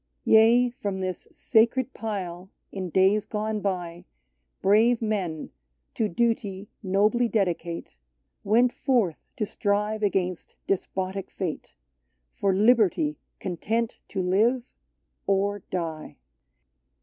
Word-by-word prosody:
David's - - +3
Yea; 235 +3 +6
from 200 -2 -2
this 185 -1 -4
sacred 240 +3 +2
pile, 190 -4 -5 0.2
in 185 -2 -4
days 190 +4 +3
gone 215 0 -2
by, 175 -3 -3 0.6
Brave 220 +5 +4
men, 195 -8 -2 0.4
to 220 -2 0
duty 205 -1 -1
nobly 210 +5 +2
dedicate, 175 -6 -1 0.5
Went 235 +4 +3
forth 225 - +1 0.2
to 215 - 0
strive 210 +2 -1
against 185 -4 -1
despotic 190 0 -2
fate 180 -5 -5 0.3
— 60 -1 -49
For 200 - +2
liberty 195 -7 +3 0.2
content 220 +6 -2
to 190 -2 -3
live 225 +7 +1 0.3
— - - -50
or 200 +1 +1
die. 165 -4 -4
200 Hz, 115 wpm, -26 LUFS, 180-220 Hz, 0.6 s, Yea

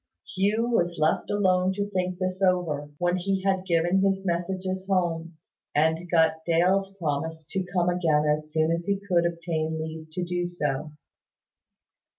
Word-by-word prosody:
Hugh 210 +5 +1
was 175 -6 +1
left 155 +1 +1
alone 185 -2 +2
to 205 +1 -2
think 185 -2 -2
this 185 +1 -3
over, 175 -6 +1
when 175 +2 +1
he 190 +1 -1
had 190 -1 0
given 175 +2 +2
his 195 0 +1
messages 185 +2 -2
home, 170 -3 -1 0.4
and 160 +3 +1
got 160 -1 +3
Dale's 185 +4 +2
promise 160 -1 -3
to 190 - -1
come 180 -1 +1
again 160 -4 +2
as 150 0 0
soon 155 +1 +2
as 170 +1 -2
he 200 -1 +1
could 175 -2 +3
obtain 165 -2 -2
leave 160 0 -6
to 180 +1 -2
do 175 0 -1
so. 150 -3 -3
175 Hz, 160 wpm, -26 LUFS, 160-190 Hz, 0.4 s, got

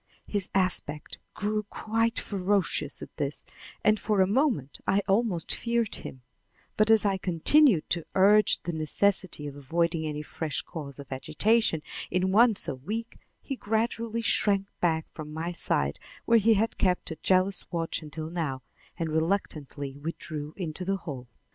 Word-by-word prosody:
His 200 -3 -2
aspect 175 -6 0 0.2
grew 210 +1 -1
quite 225 +1 0
ferocious 200 0 0
at - - -12
this, - - -3 0.4
and 215 0 +4
for 210 -2 0
a 190 - +6
moment 210 - 0
I 200 +1 +3
almost 195 -4 +1
feared 235 -2 0
him; 130 -1 -6 0.5
but 215 +1 +3
as 220 -1 +5
I 195 -1 +2
continued 185 - +4
to 170 -2 -1
urge 205 +3 +5
the 175 - -3
necessity 165 +1 0
of 145 -1 -6
avoiding 165 +3 0
any 150 0 -4
fresh 150 -1 -3
cause 145 -5 -8
of 140 -2 -11
agitation 160 - +1 0.3
in 185 +1 +1
one 225 +2 +5
so - - 0
weak, 215 - -5 0.2
he 275 - -4
gradually 230 0 -1
shrank 200 -3 +3
back 160 -2 +1
from 155 -1 -8
my 160 +3 -3
side 70 - -1 0.3
where 230 0 +5
he 220 +1 +4
had 220 +3 0
kept 180 -3 +1
a 160 - -5
jealous 185 0 +1
watch 165 -1 -2
until 155 +1 -6
now, 150 -7 -3 0.3
and 165 -2 -2
reluctantly 155 -5 -2
withdrew 155 -1 -5
into 175 -2 -4
the 195 +1 0
hall. 135 -8 -7
185 Hz, 155 wpm, -28 LUFS, 155-210 Hz, 0.5 s, a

